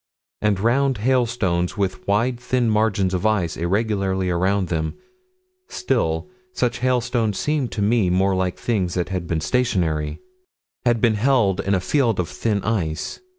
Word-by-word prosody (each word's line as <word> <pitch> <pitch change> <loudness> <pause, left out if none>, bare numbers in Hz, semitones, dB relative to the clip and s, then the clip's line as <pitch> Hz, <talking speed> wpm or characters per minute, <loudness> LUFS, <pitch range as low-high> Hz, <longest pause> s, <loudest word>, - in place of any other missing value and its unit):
And 105 -2 +1
round 130 +4 +2
hailstones 110 -8 0
with 95 -2 -2
wide 115 +5 +1
thin 125 -2 0
margins 105 -3 +1
of 90 - -1
ice 105 -6 +1
irregularly 95 0 0
around 95 +1 +1
them 80 -2 -2 0.7
still, 115 - -1 0.3
such 120 -6 -1
hailstones 120 -3 0
seem 150 -3 0
to 105 - -3
me 105 -3 +2
more 95 +2 +2
like 95 -1 -1
things 95 -7 -1
that 90 -1 -1
had 90 -3 -3
been 80 -2 -1
stationary: 80 -11 0 0.7
had 120 -2 +2
been 115 -2 +4
held 110 -4 +2
in 100 +1 +1
a - - +1
field 115 +1 +1
of 90 -1 -1
thin 100 +2 -1
ice. 85 -8 -2
100 Hz, 150 wpm, -22 LUFS, 90-120 Hz, 0.7 s, been